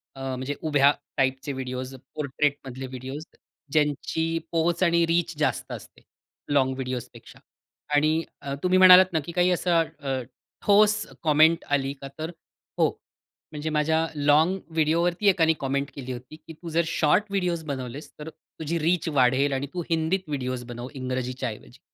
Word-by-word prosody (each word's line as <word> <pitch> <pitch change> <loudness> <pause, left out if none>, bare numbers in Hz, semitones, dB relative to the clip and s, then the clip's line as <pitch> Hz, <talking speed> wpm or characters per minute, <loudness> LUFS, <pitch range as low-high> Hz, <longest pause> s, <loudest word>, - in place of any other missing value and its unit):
अ, 135 - -9
म्हणजे 130 +3 -4
उभ्या 145 -2 +4 0.3
टाइपचे 135 +1 0
व्हिडिओज, 130 0 -5 0.2
पोर्ट्रेटमधले 135 -2 -2
व्हिडिओज, 130 +3 -7 0.5
ज्यांची 155 +2 0
पोहोच 170 +2 +1
आणि 170 -1 +4
रीच 170 0 0
जास्त 150 - -1
असते, - - -9 0.5
लॉन्ग 130 -2 +3
व्हिडिओजपेक्षा. 125 -2 -6 0.6
आणि 155 +2 +3 0.2
अ, 140 - -4
तुम्ही 185 0 +3
म्हणालात 185 0 +8
ना, 160 - +2
की 170 - -6
काही 180 +1 +2
असा 175 -1 +2
अ, 150 -5 -2 0.4
ठोस 215 +1 +4 0.2
कॉमेंट 160 +1 +4
आली 135 0 -1
का, 140 - -6
तर 160 +2 -3 0.5
हो. - - +5 0.6
म्हणजे 150 +1 -4
माझ्या 160 +1 +1
लॉन्ग 150 +6 +3
व्हिडिओवरती 170 +5 +1
एकाने 165 -4 +4
कॉमेंट 140 0 -1
केली 130 -2 -6
होती, 125 +4 -8
की 160 +1 -12
“तू 165 +2 -9
जर 165 +1 +2
शॉर्ट 165 +5 +3
व्हिडिओज 180 -4 -1
बनवलेस, 135 -1 -6
तर 150 +1 -6
तुझी 160 +1 -6
रीच 170 +2 +1
वाढेल 135 0 +3
आणि 135 +1 -2
तू 180 - -2
हिंदीत 165 +3 +1
व्हिडिओ 130 -4 -2
बनव, 120 +1 -6
इंग्रजीच्या 130 -1 -3
ऐवजी,” 105 - -11
150 Hz, 150 wpm, -25 LUFS, 135-170 Hz, 0.6 s, म्हणालात